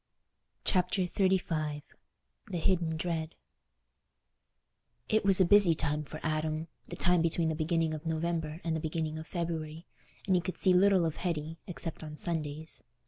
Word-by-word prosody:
Chapter 185 Hz, 0 st, +2 dB
XXXV 165 Hz, -6 st, 0 dB, 0.6 s
The 175 Hz, -, -3 dB
Hidden 165 Hz, -1 st, +1 dB
Dread 160 Hz, -1 st, -3 dB, 1.7 s
It 220 Hz, 0 st, +3 dB
was 195 Hz, -1 st, +6 dB
a 185 Hz, -, +6 dB
busy 185 Hz, -2 st, +6 dB
time 150 Hz, -1 st, -1 dB
for 155 Hz, +2 st, -8 dB
Adam—the 155 Hz, +2 st, -3 dB
time 180 Hz, -1 st, +3 dB
between 165 Hz, 0 st, +1 dB
the -, -, 0 dB
beginning 160 Hz, 0 st, 0 dB
of 155 Hz, +1 st, -6 dB
November 160 Hz, 0 st, -2 dB
and 165 Hz, -1 st, 0 dB
the -, -, -1 dB
beginning 155 Hz, 0 st, -2 dB
of 160 Hz, -, -8 dB
February, 165 Hz, -2 st, -4 dB, 0.4 s
and 190 Hz, -, +2 dB
he 180 Hz, -, +3 dB
could 185 Hz, +1 st, -5 dB
see 185 Hz, -, +4 dB
little 190 Hz, -1 st, +5 dB
of 160 Hz, -, -2 dB
Hetty, 165 Hz, -2 st, -3 dB
except 165 Hz, -3 st, -3 dB
on 150 Hz, -1 st, -8 dB
Sundays. 155 Hz, -2 st, -3 dB
165 Hz, 150 wpm, -31 LUFS, 155-180 Hz, 1.7 s, was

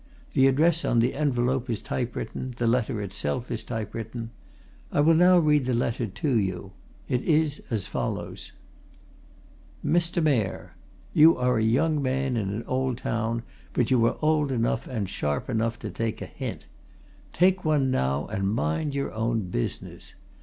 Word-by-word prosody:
The 135 Hz, 0 st, +5 dB
address 160 Hz, +5 st, +3 dB
on -, -, +1 dB
the 115 Hz, +2 st, +3 dB
envelope 130 Hz, -3 st, 0 dB
is 115 Hz, -3 st, -1 dB
typewritten; 125 Hz, 0 st, -4 dB
the 120 Hz, -, 0 dB
letter 115 Hz, -2 st, +1 dB
itself 100 Hz, +2 st, -3 dB
is 115 Hz, -, -3 dB
typewritten. 115 Hz, 0 st, -5 dB, 0.6 s
I -, -, 0 dB
will 155 Hz, +3 st, +6 dB
now 180 Hz, +2 st, +6 dB
read 150 Hz, -5 st, +3 dB
the 125 Hz, -, +1 dB
letter 120 Hz, 0 st, -1 dB
to 130 Hz, -, 0 dB
you. 95 Hz, -3 st, -3 dB, 0.4 s
It 125 Hz, -, 0 dB
is 155 Hz, -2 st, +1 dB
as 110 Hz, -5 st, -1 dB
follows: -, -, -4 dB, 1.3 s
"'MR. 170 Hz, 0 st, +1 dB
MAYOR, 125 Hz, -10 st, 0 dB, 0.4 s
"'You 160 Hz, +2 st, +7 dB
are 125 Hz, -2 st, +2 dB
a -, -, +1 dB
young 145 Hz, +7 st, +2 dB
man 130 Hz, -1 st, 0 dB
in 105 Hz, -4 st, -1 dB
an 105 Hz, +4 st, -3 dB
old 130 Hz, -1 st, -1 dB
town, 115 Hz, 0 st, -2 dB, 0.3 s
but 120 Hz, -1 st, +1 dB
you 125 Hz, -3 st, +4 dB
are -, -, -1 dB
old 155 Hz, -2 st, +2 dB
enough 115 Hz, -2 st, 0 dB
and 110 Hz, -6 st, -3 dB
sharp 75 Hz, -, -2 dB
enough 115 Hz, 0 st, 0 dB
to 105 Hz, -, -6 dB
take 115 Hz, +3 st, -3 dB
a -, -, -5 dB
hint. -, -, -6 dB, 0.7 s
Take 185 Hz, +2 st, +3 dB
one 145 Hz, -4 st, +2 dB
now, 70 Hz, -, 0 dB
and 100 Hz, -2 st, -1 dB
mind 105 Hz, -, -1 dB
your 140 Hz, -, -2 dB
own 110 Hz, -3 st, -1 dB
business. -, -, -5 dB
125 Hz, 160 wpm, -26 LUFS, 110-145 Hz, 1.3 s, You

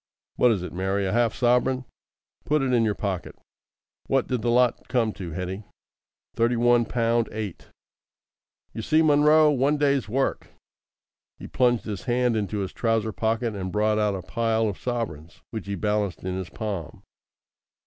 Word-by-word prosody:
"What 125 Hz, -, +4 dB
is 100 Hz, -5 st, -1 dB
it, 90 Hz, -, -7 dB
Mary? 95 Hz, +2 st, -1 dB
A 95 Hz, -, -1 dB
half 120 Hz, 0 st, +2 dB
sovereign? 125 Hz, +1 st, +2 dB, 0.6 s
Put 150 Hz, -1 st, +1 dB
it 130 Hz, -1 st, 0 dB
in 120 Hz, -2 st, +4 dB
your 105 Hz, -2 st, +1 dB
pocket. 95 Hz, -4 st, -4 dB, 0.7 s
What 135 Hz, -2 st, +2 dB
did 125 Hz, -3 st, -2 dB
the 120 Hz, -, 0 dB
lot 120 Hz, 0 st, +2 dB
come 115 Hz, -4 st, +1 dB
to, 90 Hz, -3 st, -7 dB
Hetty?" 90 Hz, +5 st, -5 dB, 0.7 s
"Thirty 115 Hz, +1 st, +2 dB
one 120 Hz, 0 st, +3 dB
pound 115 Hz, 0 st, 0 dB
eight." 105 Hz, -5 st, -6 dB, 1.1 s
"You 110 Hz, -, -5 dB
see, 155 Hz, +8 st, +3 dB
Munro! 150 Hz, 0 st, +5 dB
One 140 Hz, +2 st, +2 dB
day's 140 Hz, -6 st, +1 dB
work." 135 Hz, +4 st, -1 dB, 0.9 s
He -, -, -10 dB
plunged 120 Hz, -2 st, +1 dB
his 105 Hz, +2 st, -5 dB
hand 125 Hz, -1 st, +1 dB
into 105 Hz, -1 st, -2 dB
his 95 Hz, -1 st, -4 dB
trouser 115 Hz, -2 st, 0 dB
pocket 115 Hz, +2 st, -1 dB
and 95 Hz, -2 st, -4 dB
brought 105 Hz, +1 st, +1 dB
out 105 Hz, -2 st, +1 dB
a 95 Hz, -, -6 dB
pile 115 Hz, +2 st, 0 dB
of 100 Hz, -, -4 dB
sovereigns, 105 Hz, -11 st, -5 dB
which 110 Hz, -3 st, -6 dB
he 100 Hz, -, -2 dB
balanced 105 Hz, -1 st, -1 dB
in 90 Hz, 0 st, -3 dB
his 95 Hz, -2 st, -5 dB
palm. 100 Hz, -8 st, -5 dB
115 Hz, 170 wpm, -25 LUFS, 100-125 Hz, 1.1 s, Munro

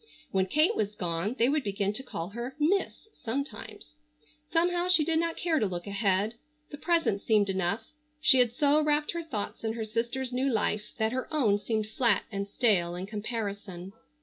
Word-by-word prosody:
When 190 Hz, -1 st, +1 dB
Kate 310 Hz, -, +3 dB
was 210 Hz, -, -1 dB
gone 180 Hz, +4 st, -2 dB
they 235 Hz, -, +4 dB
would 290 Hz, +1 st, +1 dB
begin 200 Hz, 0 st, -1 dB
to 215 Hz, -, -3 dB
call 175 Hz, -9 st, -5 dB
her 235 Hz, +5 st, -6 dB
"Miss" 370 Hz, +8 st, 0 dB, 0.2 s
sometimes. 225 Hz, -, -5 dB, 0.6 s
Somehow 350 Hz, +1 st, +2 dB
she 335 Hz, -4 st, +6 dB
did 320 Hz, 0 st, +2 dB
not 335 Hz, 0 st, -1 dB
care 330 Hz, -3 st, +1 dB
to 215 Hz, -, +1 dB
look 175 Hz, -2 st, -5 dB
ahead. 200 Hz, +2 st, 0 dB, 0.3 s
The 290 Hz, -, -8 dB
present 330 Hz, -, +1 dB
seemed 210 Hz, -3 st, +2 dB
enough. 190 Hz, +3 st, -1 dB, 0.3 s
She 265 Hz, -3 st, +6 dB
had 245 Hz, -2 st, +4 dB
so 295 Hz, +2 st, +4 dB
wrapped 300 Hz, 0 st, +1 dB
her 340 Hz, -, -3 dB
thoughts 230 Hz, -13 st, -5 dB
in 220 Hz, 0 st, -1 dB
her 225 Hz, -1 st, -3 dB
sister's 240 Hz, +4 st, -2 dB
new 265 Hz, +2 st, +1 dB
life 210 Hz, -1 st, -1 dB
that 220 Hz, -1 st, +1 dB
her 255 Hz, +1 st, -4 dB
own 225 Hz, -10 st, +2 dB
seemed 215 Hz, +1 st, -1 dB
flat 235 Hz, +2 st, +2 dB
and 200 Hz, -1 st, -3 dB
stale 195 Hz, -6 st, +1 dB
in 180 Hz, +1 st, -4 dB
comparison. 205 Hz, -3 st, -5 dB
225 Hz, 185 wpm, -29 LUFS, 200-285 Hz, 0.6 s, she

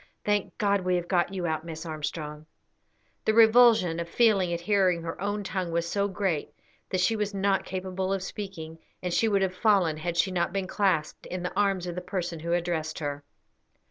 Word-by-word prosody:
"Thank 205 Hz, -1 st, 0 dB
God, 200 Hz, -2 st, +2 dB
we 180 Hz, 0 st, +1 dB
have 175 Hz, -1 st, -2 dB
got 175 Hz, -1 st, +1 dB
you 185 Hz, -3 st, -3 dB
out, 160 Hz, -1 st, -1 dB
Miss 165 Hz, 0 st, -7 dB
Armstrong." 150 Hz, -1 st, -5 dB, 0.8 s
The 220 Hz, -, +2 dB
revulsion 225 Hz, -7 st, +6 dB
of 170 Hz, 0 st, -4 dB
feeling 200 Hz, -5 st, +3 dB
at 170 Hz, 0 st, -2 dB
hearing 185 Hz, -3 st, +2 dB
her 165 Hz, +1 st, -5 dB
own 205 Hz, +1 st, -2 dB
tongue 185 Hz, -3 st, -3 dB
was 170 Hz, 0 st, 0 dB
so 200 Hz, +3 st, 0 dB
great 190 Hz, -5 st, -2 dB, 0.3 s
that 185 Hz, -, -1 dB
she 225 Hz, +5 st, +2 dB
was 210 Hz, -1 st, -2 dB
not 195 Hz, 0 st, +1 dB
capable 185 Hz, 0 st, -3 dB
of 195 Hz, -1 st, -1 dB
speaking, 170 Hz, -6 st, -7 dB, 0.2 s
and 180 Hz, -1 st, -2 dB
she 225 Hz, -, +3 dB
would 200 Hz, -2 st, +2 dB
have 185 Hz, -1 st, 0 dB
fallen 185 Hz, -6 st, +2 dB
had 170 Hz, +2 st, -3 dB
she 190 Hz, -, +2 dB
not 180 Hz, 0 st, 0 dB
been 195 Hz, -1 st, -1 dB
clasped 185 Hz, -6 st, 0 dB
in 180 Hz, 0 st, -5 dB
the 180 Hz, -, -3 dB
arms 195 Hz, -3 st, +1 dB
of 175 Hz, -, -4 dB
the 180 Hz, -, -4 dB
person 175 Hz, -3 st, -4 dB
who 170 Hz, +2 st, -4 dB
addressed 170 Hz, -3 st, -1 dB
her. 145 Hz, -1 st, -4 dB
185 Hz, 205 wpm, -27 LUFS, 170-200 Hz, 0.8 s, revulsion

